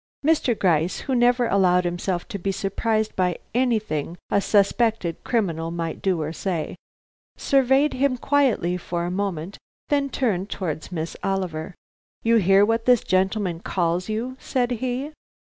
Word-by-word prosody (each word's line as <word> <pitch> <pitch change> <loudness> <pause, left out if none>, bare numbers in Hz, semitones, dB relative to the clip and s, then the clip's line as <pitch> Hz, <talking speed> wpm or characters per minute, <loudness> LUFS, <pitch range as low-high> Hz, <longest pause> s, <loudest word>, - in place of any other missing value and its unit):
Mr. 290 -7 +2
Gryce, 170 -1 +1
who 270 - -3
never 245 0 +3
allowed 180 -4 +3
himself 175 +1 -2
to 205 -4 -5
be 195 +2 -1
surprised 215 +2 -1
by 180 -2 +1 0.2
anything 215 - 0
a 200 - +3
suspected 205 -3 +1
criminal 170 -9 -1
might 165 -1 -4
do 185 -3 +1
or 155 +2 -4
say, 170 -4 -3 0.6
surveyed 270 +2 +3
him 260 -1 +1
quietly 245 -11 +1
for 175 -1 -3
a 175 - -3
moment, 190 -2 -3 0.3
then 280 -1 +1
turned 205 -8 -1
towards 160 -4 -4
Miss 165 -2 -4
Oliver. 185 -3 -2 0.5
"You 230 0 +4
hear 195 0 +5
what 225 +1 0
this 250 -3 +4
gentleman 190 -2 0
calls 175 +1 -1
you?" 235 +4 -3
said 250 -2 -1
he. 255 +4 -2
195 Hz, 145 wpm, -23 LUFS, 175-240 Hz, 0.6 s, hear